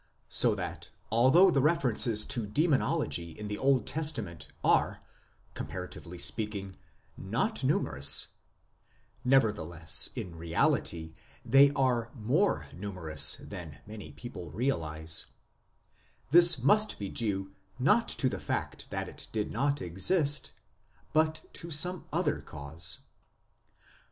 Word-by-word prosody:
So - - +5
that - - -6 0.2
although 135 - +5
the 140 - +2
references 125 -8 +2
to 115 -4 -2
Demonology 105 - 0
in 105 - -7
the 105 0 -5
Old 135 -2 +2
Testament 105 - -1 0.2
are, - - +1 0.5
comparatively 90 +1 -7
speaking, 100 +2 -1 0.4
not - - -2
numerous 70 +1 +2 0.9
(nevertheless, 105 -11 +2
in 85 -2 -6
reality, 80 0 -1 0.3
they 135 +4 +6
are 125 -4 0
more 135 - 0
numerous 90 -6 0
than 85 -8 -9
many 105 -1 -10
people 95 -9 -9
realize), 80 - +2 1.0
this 170 0 +7
must 210 - +3
be 100 - -5
due 95 -4 -2 0.3
not 145 - +2
to 130 - +2
the - - -3
fact - - -4
that - - -4
it - - -7
did 105 -1 -3
not 140 0 -1
exist, 145 - 0 0.6
but 155 0 0
to 170 - -6
some 175 +4 +2
other 160 -1 -1
cause. 75 +2 -3
110 Hz, 110 wpm, -29 LUFS, 85-145 Hz, 1.0 s, this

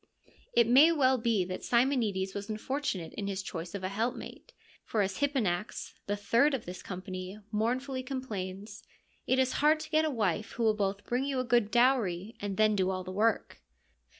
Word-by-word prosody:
It 235 - +5
may 270 +8 +7
well 265 -5 +3
be 225 -5 +1
that 185 0 -6
Simonides 235 -7 +1
was 200 +1 -6
unfortunate 215 - -3
in 200 -2 -4
his 195 -1 -3
choice 170 0 -6
of 195 - -5
a 185 - -1
helpmate, 230 - -4 0.3
for 215 -2 0
as 190 0 -3
Hipponax, 230 -9 -1
the 205 - 0
third 235 +8 +3
of 240 - -6
this 180 +1 -7
com 185 -1 -7
pany, 185 +2 -7
mournfully 255 +5 -1
complains, 210 -5 -5 0.2
' - - -38
It 260 - +3
is 260 -1 +2
hard 305 +1 +5
to 310 0 -8
get 310 0 +4
a 315 - +1
wife 215 - -1
who 235 - -2
will 220 -1 +4
both 200 -1 -2
bring 250 +3 0
you 275 -2 -1
a - - +1
good 240 -3 +2
dowry 230 -5 +2
and 200 -1 -4
then 215 -1 +4
do 190 -1 +1
all 185 -1 -2
the 185 - -7
work.' 220 +4 0
215 Hz, 200 wpm, -30 LUFS, 195-255 Hz, 0.3 s, may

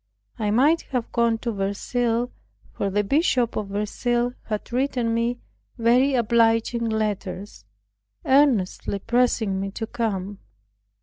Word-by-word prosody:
I 210 -2 0
might 280 +10 +4
have 245 -3 -2
gone 235 -1 +2
to 235 - -1
Verceil; 230 +4 -1 0.4
for 200 - -2
the 205 +2 +1
Bishop 250 - +1
of 210 - -2
Verceil 240 +4 -1
had 215 +1 -5
written 250 -3 0
me 235 +1 0 0.4
very 250 +4 +3
obliging 230 0 +2
letters, 205 - -3 0.6
earnestly 260 -9 +2
pressing 225 -3 +1
me 195 0 -2
to 225 +3 -5
come. 205 -4 -3
230 Hz, 120 wpm, -24 LUFS, 205-245 Hz, 0.6 s, might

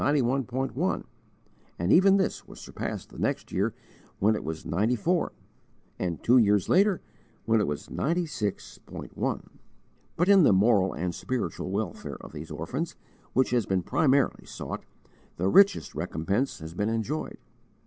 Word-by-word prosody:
1, 135 -2 0 0.7
and 85 +4 +2
even 195 +2 +6
this 190 - -1
was - - -12
surpassed - - -6
the - - -11
next - - -1
year 100 +5 +1 0.5
when 105 +3 +3
it - - -4
was 80 0 -5
94, 115 - +1 0.7
and, 85 -3 -3
two 125 +2 +6
years 105 -3 +3
later, 195 0 +3 0.4
when 115 -1 +3
it - - 0
was 75 -1 -4
96.1. 155 - -3 0.7
But 175 - +1
in 200 -1 +7
the 145 - +6
moral 95 -1 +4
and 90 +2 -2
spiritual 125 -2 -3
welfare 100 -2 -3
of - - -11
these 80 +1 -7
orphans, 125 - -4 0.4
which 130 -1 +2
has 120 -4 +1
been 95 -2 +1
primarily 140 - +2
sought, - - -6 0.5
the 90 - 0
richest 200 - +5
recompense 95 - -1
has 80 0 -8
been 105 +4 -1
enjoyed. 115 +7 -2
115 Hz, 140 wpm, -27 LUFS, 95-145 Hz, 0.7 s, in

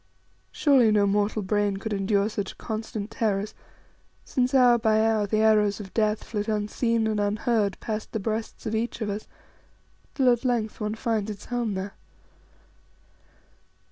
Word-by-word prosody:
Surely 265 -7 +4
no 205 -1 +4
mortal 205 +1 +1
brain 205 0 0
could 215 +2 -4
endure 200 +1 +1
such 205 -3 -4
constant 220 -2 -5
terrors, 210 -1 -1 0.7
since 255 0 0
hour 245 -2 +6
by 220 -1 +3
hour 220 -2 +2
the 215 +1 +1
arrows 210 -2 +3
of 195 -2 -9
death 215 -1 +1
flit 210 -1 -4
unseen 220 +2 0
and 215 -1 0
unheard 205 0 0
past 215 -1 -4
the 220 - -2
breasts 220 +2 -4
of 220 - -2
each 225 +2 -2
of 210 -2 -1
us, 205 +2 -5 0.9
till 255 -3 +4
at 240 - -3
length 235 -4 -1
one 210 +1 -2
finds 220 -3 -1
its 205 -1 -7
home 240 -4 -2
there. 190 +1 -4
215 Hz, 155 wpm, -26 LUFS, 205-225 Hz, 0.9 s, hour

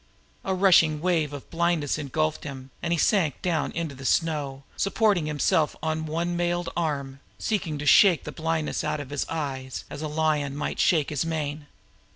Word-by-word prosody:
A 190 - -1
rushing 170 -5 +5
wave 165 -3 +1
of 145 -2 -8
blindness 165 -4 0
engulfed 155 +2 -1
him, 135 -2 -8
and 170 - -2
he 170 - +2
sank 165 - +2
down 170 -3 0
into 165 -3 -3
the 135 0 -11
snow, 145 -3 0
supporting 195 -5 +2
himself 150 +1 +1
on 160 0 -1
one 170 +3 -1
mailed 175 0 0
arm, 140 -5 -2 0.2
seeking 180 -8 -2
to 145 - -5
shake 175 +4 +6
the 150 - -6
blindness 160 -1 -2
out 150 - -1
of 145 -2 -7
his 145 - -2
eyes 135 -5 -4
as 145 - -6
a 155 - -2
lion 150 -2 0
might 145 - -3
shake 155 -6 +3
his 150 -1 0
mane. 150 -2 -3
155 Hz, 180 wpm, -26 LUFS, 145-170 Hz, 0.2 s, shake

